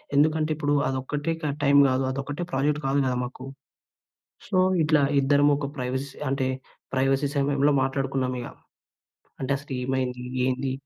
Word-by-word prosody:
ఎందుకంటే, 155 +2 +3
ఇప్పుడు 145 -1 0
అదొక్కటే 140 +4 -2
క 150 -3 -1
టైం 140 0 +5
గాదు. 130 0 +1
అదొక్కటే 140 +5 -4
ప్రాజెక్ట్ 145 +2 0
కాదు 135 +1 +2
కదా! 130 -1 0
మాకు. 130 +1 -7 1.0
సో, - - 0 0.3
ఇట్లా 150 -1 +3 0.2
ఇద్దరమొక 145 +1 +3
ప్రైవసీ 130 +2 -3 0.2
అంటే, 135 -1 0 0.5
ప్రైవసీ 135 +2 +2
సమయంలో 140 +1 +2
మాట్లాడుకున్నామిగ. 130 -2 -2 1.0
అంటే, 135 +1 -1
అసలేమైంది? 130 -2 -3 0.2
ఏంది? 130 +1 -1
135 Hz, 120 wpm, -25 LUFS, 130-145 Hz, 1.0 s, టైం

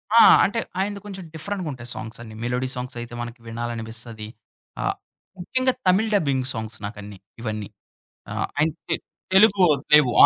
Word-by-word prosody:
ఆ! - - +9 0.2
అంటే, 205 +3 +1 0.2
ఆయనది 200 +1 -1
కొంచెం 190 -3 -7
డిఫరెంటుగుంటయి 155 -8 -3
సాంగ్స్ 110 +1 -7
అన్నీ. 110 -2 -9
మెలోడీ 125 +2 0
సాంగ్స్ 125 -1 -5
అయితే 120 0 -8
మనకి 120 0 -6
వినాలనిపిస్తది. 115 -1 -4 0.5
ఆ! - - -1 0.6
ముఖ్యంగా 255 +7 +1
తమిళ్ 200 +5 +4
డబ్బింగ్ 140 -8 +1
సాంగ్స్ 110 -1 -4
నాకన్నీ 105 -1 -7 0.2
ఇవన్నీ. 110 -3 -3 0.7
ఆహ్, - - -1
ఆయనకి 155 +1 0 0.4
తెలుగు 195 -1 +7 0.3
లేవు. 145 -5 +7
125 Hz, 135 wpm, -24 LUFS, 115-190 Hz, 0.7 s, ఆ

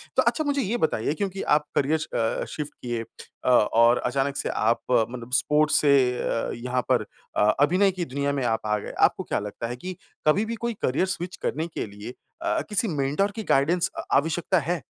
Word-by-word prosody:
तो - - +5
अच्छा, 310 - +1
मुझे 285 -1 0
ये 235 +1 -1
बताइए, 150 - 0
क्योंकि 195 +3 -3
आप 150 0 0
करियर 145 +3 +2
च - - -5
अ, 115 -1 0
शिफ्ट 150 -1 -5
किए 120 -2 -3 0.4
अ, - - +3
और 115 0 +5
अचानक 135 +2 0
से - - -2
आप 115 +2 +1
मतलब 120 +1 0
स्पोर्ट्स 150 +3 +3
से 145 -2 +5 0.3
अ, 115 - -1
यहाँ 125 +1 -2
पर - - +2 0.3
अ, - - +2 0.2
अभिनय 180 +7 +4
की 180 -2 -3
दुनिया 140 0 -1
में 140 -2 -1
आप 115 -1 +1
आ 105 0 +2
गए। - - -7 0.2
आपको - - -7
क्या - - -1
लगता 105 +3 -5
है 120 - -4
कि 185 +9 -7 0.3
कभी 195 +8 +4
भी 230 +1 -3
कोई 235 - 0
करियर 135 +8 +1
स्विच 175 +1 -6
करने 160 +3 -1
के 165 - -4
लिए 105 +4 -9 0.3
अ, 335 -1 0
किसी 215 +2 +1
मेंटर 150 +6 0
की 220 +2 -6
गाइडेंस 170 +6 +2
अ, - - -3
आवश्यकता 165 +5 +2
है? 170 +2 -2
145 Hz, 210 wpm, -25 LUFS, 125-180 Hz, 0.4 s, तो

